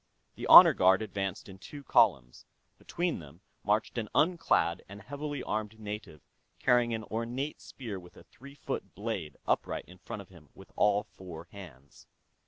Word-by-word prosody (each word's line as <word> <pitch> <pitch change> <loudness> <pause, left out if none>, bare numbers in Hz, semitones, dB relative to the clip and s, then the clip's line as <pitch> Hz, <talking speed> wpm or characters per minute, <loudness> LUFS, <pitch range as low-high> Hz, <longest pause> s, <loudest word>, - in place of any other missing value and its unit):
The - - -6
honor - - +11
guard 95 +3 +4
advanced 100 +1 -4
in 95 -1 -12
two 145 +8 -10
columns; 70 - +2 0.3
between 175 -1 -2
them 80 +2 -14 0.2
marched 105 +3 0
an 110 -2 -5
unclad 150 - +2
and 100 +1 -10
heavily 145 +1 -5
armed 110 +1 -4
native 105 -8 -7 0.4
carrying 120 -2 +3
an 110 - -5
ornate 120 +7 -4
spear 110 -7 -7
with 90 0 -16
a - - -14
three 140 +3 -15
foot 145 - -6
blade 100 -7 -5
upright - - -1
in 90 0 -16
front 100 +3 -7
of - - -25
him 85 -6 -17
with - - -15
all 105 0 +3
four 85 -4 -11
hands. 70 -9 -14
105 Hz, 165 wpm, -30 LUFS, 90-120 Hz, 0.4 s, honor